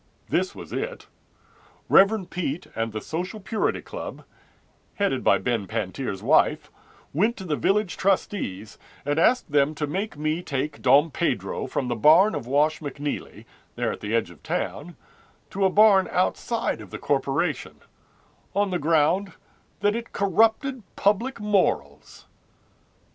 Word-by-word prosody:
This - - 0
was - - -9
it: - - -4 0.8
Rev. 195 -1 +5
Peet 175 -3 -3
and 115 0 -2
the 110 0 -5
Social 180 +7 -4
Purity 210 +2 -1
Club, - - -7 0.7
Headed 200 -10 0
by - - +5
Ben 115 -5 -2
Pantier's 95 +2 -4
wife, - - +3 0.4
Went 215 - +1
to 190 - -7
the 160 -5 -1
Village 195 - 0
trustees, 180 - -1 0.3
And 145 +2 0
asked 245 - +3
them 145 +1 +2
to 150 - -2
make 190 +4 -4
me 155 +3 -1
take 145 -2 -3
Dom 145 +5 +5
Pedro - - -2
From 130 - -2
the 120 - -1
barn 165 - +6
of 120 - -4
Wash 150 +4 +2
McNeely, 145 -1 -5 0.3
there - - -1
at - - -7
the 105 +2 -2
edge 115 -6 0
of 85 - -17
town, 170 +3 -4 0.6
To 195 0 0
a - - +5
barn 200 -1 +5
outside 230 +5 -1
of - - -11
the - - -6
corporation, - - -1 0.7
On 200 -1 +1
the 180 - 0
ground 165 +5 +2 0.5
that 205 +1 +2
it 235 0 -6
corrupted 225 - +2
public 230 +6 +1
morals. 210 -3 -1
175 Hz, 145 wpm, -25 LUFS, 140-205 Hz, 0.8 s, barn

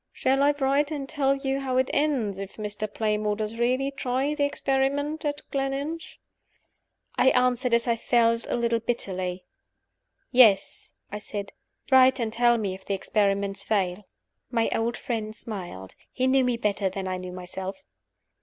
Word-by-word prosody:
"Shall 270 +1 +1
I 290 +1 +4
write 285 +1 +1
and 285 -3 -4
tell 275 -2 +1
you 270 0 -2
how 260 -2 -1
it 260 0 +2
ends, 255 -10 0
if 195 0 -7
Mr. 210 0 -4
Playmore 210 -1 0
does 215 +2 -4
really 255 +3 +1
try 270 +2 -1
the 295 -1 0
experiment 285 +2 0
at 290 0 -2
Gleninch?" 275 +4 -3 1.0
I 260 - +6
answered, 250 -1 +2
as 235 - +1
I 235 -1 +2
felt, 230 0 +2
a - - -1
little 235 -1 +1
bitterly. 185 -6 -3 0.9
"Yes," 220 -7 +4 0.2
I 210 - -4
said 205 -1 -6 0.4
"Write 260 0 +6
and 225 -2 -2
tell 240 0 +4
me 200 -4 -2
if 190 0 -10
the 200 - -2
experiment 200 0 0
fail." 200 -2 -1 0.5
My 230 -2 +1
old 230 +1 -1
friend 220 -4 -4
smiled. 180 - -7 0.2
He 255 - -1
knew 260 0 +4
me 245 -1 +1
better 205 -3 0
than 190 0 -5
I 185 0 -2
knew 185 0 -7
myself. 185 +1 -6
235 Hz, 165 wpm, -26 LUFS, 205-270 Hz, 1.0 s, I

